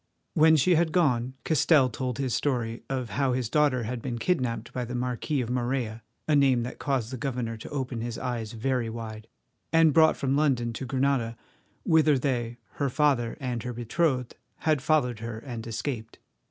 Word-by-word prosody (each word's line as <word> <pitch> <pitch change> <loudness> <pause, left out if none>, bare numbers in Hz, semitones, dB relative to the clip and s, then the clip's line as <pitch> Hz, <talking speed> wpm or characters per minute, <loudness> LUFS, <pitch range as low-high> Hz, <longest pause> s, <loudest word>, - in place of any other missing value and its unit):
When 160 +1 +6
she 155 +5 +4
had 165 -1 +2
gone, 130 -7 +1
Castell 155 -2 +4
told 125 0 -3
his 130 -3 -1
story 120 -5 -1
of 130 -5 -3
how 135 +4 +1
his 125 -3 -1
daughter 145 -5 +3
had 120 +2 -4
been 120 -1 -3
kidnapped 120 -5 -1
by 125 - -2
the 120 +1 -5
Marquis 125 +3 -1
of 120 -1 -3
Morella, 120 -2 -1 0.3
a 155 - +3
name 135 -4 +4
that 125 - -6
caused 135 -5 -1
the - - -3
governor 120 -3 -3
to 110 - -9
open 130 -5 -3
his 115 0 -4
eyes 115 -3 -4
very 120 0 -1
wide, 110 -1 -7 0.4
and 165 -2 +5
brought 160 +1 +5
from 135 0 0
London 130 -6 +1
to 130 - -5
Granada, 130 -3 0 0.5
whither 155 -3 +4
they, 120 -3 -1 0.2
her 140 -2 0
father 135 -4 +1
and 125 -3 -3
her 125 +1 -4
betrothed, 125 +2 0 0.3
had 155 -4 +2
followed 125 -6 +1
her 115 0 -5
and 115 -1 -7
escaped. 115 0 -4
125 Hz, 180 wpm, -27 LUFS, 115-140 Hz, 0.5 s, When